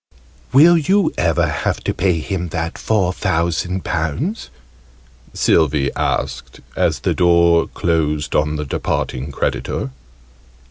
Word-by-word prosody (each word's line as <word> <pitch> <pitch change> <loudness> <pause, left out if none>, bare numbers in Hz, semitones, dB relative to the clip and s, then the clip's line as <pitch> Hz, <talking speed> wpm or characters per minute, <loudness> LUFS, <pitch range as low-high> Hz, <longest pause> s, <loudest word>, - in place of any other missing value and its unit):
"Will 165 +6 +6
you 190 +3 +2
ever 85 -4 +1
have - - -2
to - - -1
pay 90 -1 +1
him 90 -2 -3
that 80 0 -4
four 95 -5 +1
thousand 85 +2 -1
pounds?" 85 - -2 0.9
Sylvie 75 -4 +2
asked - - -3 0.2
as - - 0
the - - 0
door 85 -1 +4
closed 75 -5 -1
on 75 0 +1
the 75 0 -3
departing 65 0 -3
creditor. 65 - -2
85 Hz, 120 wpm, -19 LUFS, 75-95 Hz, 0.9 s, Will